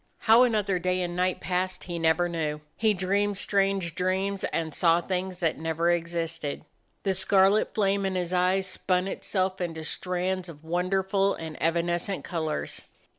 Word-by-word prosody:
How 225 Hz, +2 st, +6 dB
another 210 Hz, -6 st, +2 dB
day 185 Hz, +1 st, 0 dB
and 175 Hz, 0 st, -4 dB
night 180 Hz, 0 st, 0 dB
passed 185 Hz, 0 st, -2 dB
he 175 Hz, -2 st, -5 dB
never 165 Hz, +2 st, +3 dB
knew. 155 Hz, -3 st, -3 dB
He 220 Hz, -2 st, +2 dB
dreamed 200 Hz, +2 st, 0 dB
strange 195 Hz, -4 st, +1 dB
dreams 190 Hz, +2 st, -1 dB
and 160 Hz, -2 st, -2 dB
saw 165 Hz, +1 st, +4 dB
things 185 Hz, +1 st, -3 dB
that 165 Hz, -3 st, 0 dB
never 165 Hz, +1 st, +1 dB
existed. 165 Hz, -3 st, -2 dB, 0.4 s
The 195 Hz, -, +1 dB
scarlet 190 Hz, +2 st, +3 dB
flame 200 Hz, -1 st, +2 dB
in 190 Hz, -, -2 dB
his 180 Hz, -1 st, -2 dB
eyes 185 Hz, +1 st, +2 dB
spun 185 Hz, 0 st, 0 dB
itself 190 Hz, -1 st, -2 dB
into 165 Hz, -2 st, -3 dB
strands 180 Hz, +2 st, -2 dB
of 155 Hz, -2 st, -12 dB
wonder 180 Hz, +3 st, 0 dB
ful 195 Hz, +1 st, +1 dB
and 160 Hz, -1 st, -7 dB
evanescent 175 Hz, +3 st, 0 dB
colors. 160 Hz, -3 st, -3 dB
180 Hz, 160 wpm, -27 LUFS, 170-195 Hz, 0.4 s, How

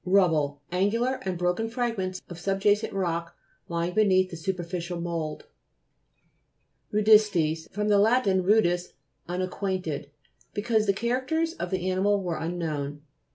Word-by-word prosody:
RUBBLE 160 Hz, -7 st, +2 dB
Angular 230 Hz, +8 st, +1 dB
and 190 Hz, -6 st, -3 dB
broken 180 Hz, +6 st, 0 dB
frag 235 Hz, 0 st, -1 dB
ments 185 Hz, -2 st, -4 dB
of 175 Hz, -1 st, -9 dB
subjacent 195 Hz, +3 st, +1 dB
rock 170 Hz, -3 st, -2 dB, 0.3 s
lying 170 Hz, +1 st, -2 dB
be 215 Hz, +2 st, +4 dB
neath 185 Hz, -2 st, +3 dB
the -, -, -5 dB
superficial 175 Hz, 0 st, -3 dB
mould. 165 Hz, -3 st, -4 dB, 1.5 s
RUDI'STES 205 Hz, -7 st, +4 dB
fr. 210 Hz, +2 st, -2 dB
lat. 210 Hz, +4 st, +4 dB
rudis, 185 Hz, -2 st, +2 dB, 0.4 s
unacquaint 185 Hz, +1 st, -2 dB
ed, 145 Hz, -2 st, -4 dB, 0.5 s
because 215 Hz, 0 st, +1 dB
the 200 Hz, -, +4 dB
characters 260 Hz, +10 st, 0 dB
of 175 Hz, -, -5 dB
the 185 Hz, 0 st, -2 dB
animal 195 Hz, +2 st, +2 dB
were 170 Hz, -3 st, -2 dB
unknown. 150 Hz, -4 st, -3 dB
185 Hz, 130 wpm, -27 LUFS, 170-210 Hz, 1.5 s, be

